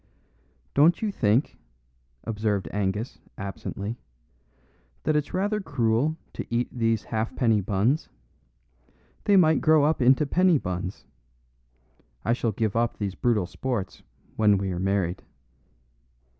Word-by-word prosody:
"Don't 165 +8 +4
you 215 - 0
think," 115 - +1 0.6
observed 105 -3 -1
Angus, 105 +3 -2 0.2
absently, 100 +3 -5 1.0
"that 155 - +1
it's 150 -1 0
rather 205 +3 0
cruel 140 -1 0 0.2
to - - -4
eat 120 +1 0
these 115 -3 0
halfpenny 110 -1 0
buns? 105 - 0 1.2
They 200 -1 +5
might 160 -4 +4
grow 155 -2 +5
up 155 -1 +2
into 130 +4 +5
penny 180 +3 +3
buns. 90 -4 -5 1.2
I 115 - +3
shall 120 -2 0
give 110 0 -1
up 120 0 0
these 100 -3 -3
brutal 110 -3 +1
sports 115 -1 -4 0.4
when 105 -2 +4
we 95 0 -2
are 90 - -3
married." 95 -1 0
115 Hz, 120 wpm, -26 LUFS, 100-145 Hz, 1.2 s, They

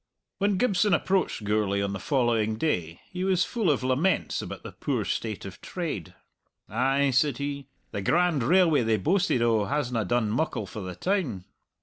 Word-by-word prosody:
When 200 -1 +2
Gibson 205 -2 +3
approached 190 - 0
Gourlay 105 -1 +1
on 100 0 -2
the 95 - -4
following 115 -3 +1
day 85 - -1
he 180 0 -3
was 185 -2 +2
full 225 -7 0
of 140 -3 +1
laments 135 +9 +1
about - - -7
the - - -7
poor - - -2
state - - -3
of - - -9
trade. 160 - -5 0.5
"Ay," 135 +5 +1
said 130 0 +2
he, 140 -1 -4 0.2
"the 100 - -3
grand 170 - +2
railway 165 +2 +4
they 110 -1 +2
boasted 175 - +1
o' 110 -3 +2
hasna 125 -5 -1
done 115 +1 +1
muckle 120 -4 -1
for 105 +2 -7
the 90 -1 -6
town!" 150 - -1
135 Hz, 175 wpm, -27 LUFS, 110-175 Hz, 0.5 s, railway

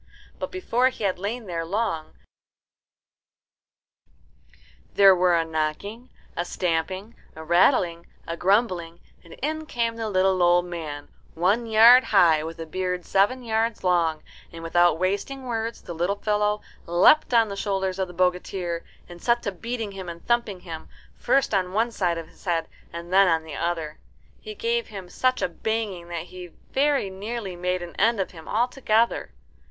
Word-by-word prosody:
But - - -3
before 260 -9 +1
he 255 - -9
had 190 -3 0
lain 220 +4 -4
there 170 -3 -3
long 180 -3 -2 2.8
there 195 -1 +7
were 180 -1 +3
a 165 - 0
knocking, 160 +10 -3 0.3
a 175 - -1
stamping, 180 +5 -2 0.2
a 160 - -8
rattling, 170 0 +2 0.2
a 165 - -4
grumbling, 180 -3 +1 0.2
and 170 - -14
in 310 +1 -2
came 230 -4 -1
the 225 -1 -3
little 185 -1 +2
old 175 0 +4
man, 155 -5 -6 0.3
one 200 +8 +1
yard 230 +3 +7
high, 165 -7 +4
with 165 +1 -6
a 165 - -6
beard 180 +2 -3
seven 225 +7 +2
yards 225 -1 -1
long, 170 -3 +1 0.3
and 165 -1 -9
without 175 0 +3
wasting 200 +9 -2
words 230 -2 -4
the 175 - -7
little 175 +4 0
fellow 210 0 0 0.3
leapt 180 - +5
on 230 -3 +4
the 200 - -5
shoulders 195 -2 -2
of 190 - 0
the - - -10
bogatir, 180 -1 -1 0.2
and 175 -1 -12
set 235 0 +1
to 200 - -2
beating 225 +2 -5
him 190 -2 -7
and 170 0 -10
thumping 235 -6 0
him, 160 -3 -8 0.3
first 275 -4 +1
on 185 -2 0
one 225 +3 +1
side 175 -6 0
of 165 -1 -6
his - - -21
head 170 -3 0 0.2
and 170 +1 -7
then 195 0 +6
on 165 -2 +2
the 160 -2 -9
other. 165 -3 -3 0.4
He 430 -1 -9
gave 470 +2 -1
him 190 -3 -9
such 255 +7 0
a - - +2
banging 200 -1 -3
that 170 -1 -4
he 180 0 -10 0.2
very 275 -7 +1
nearly 200 0 -5
made 180 0 -2
an 170 - -9
end 225 +1 +3
of 190 - -2
him 160 -3 -13
altogether. 235 -1 +1
190 Hz, 170 wpm, -25 LUFS, 170-225 Hz, 2.8 s, there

